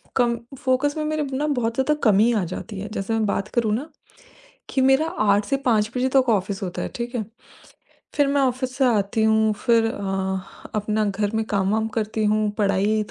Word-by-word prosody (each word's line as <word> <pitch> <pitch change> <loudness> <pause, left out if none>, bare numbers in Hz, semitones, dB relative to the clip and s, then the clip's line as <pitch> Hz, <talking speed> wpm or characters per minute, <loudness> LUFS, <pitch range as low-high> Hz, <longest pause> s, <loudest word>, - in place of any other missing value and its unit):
कम 240 -2 +2 0.2
focus 270 +3 +1
में 305 - -1
मेरे 310 0 -1
ब 275 - -6
ना 295 +3 0
बहुत 240 -5 0
ज़्यादा 265 +4 +2
कमी 215 +2 +5
आ 210 -4 +1
जाती 190 +3 -6
है। 205 - -5
जैसे 195 +1 -2
मैं 225 -1 +1
बात 200 0 -1
करूँ 220 -3 +2
ना 290 +7 -5 0.8
कि 265 - 0
मेरा 270 +4 +4
8 205 -9 +1
से 275 - 0
5 215 -3 +2
बजे 255 +1 +1
तक 260 -2 +4
ऑफिस 200 -1 -1
होता 180 -2 -4
है, - - -3
ठीक 240 +1 -5
है। 225 -4 -1 0.9
फिर 290 -1 +3
मैं 280 0 +2
ऑफिस 255 -1 -1
से 270 - +3
आती 220 -1 +1
हूँ, 220 0 +3
फिर 230 +2 +2
अ, 190 -3 -4
अपना 215 +1 0
घर 205 0 -1
में 220 - +1
काम-वाम 210 +2 0
करती 220 0 -1
हूँ, 215 0 +2
पढ़ाई 205 +1 +1
220 Hz, 200 wpm, -23 LUFS, 205-255 Hz, 0.9 s, कमी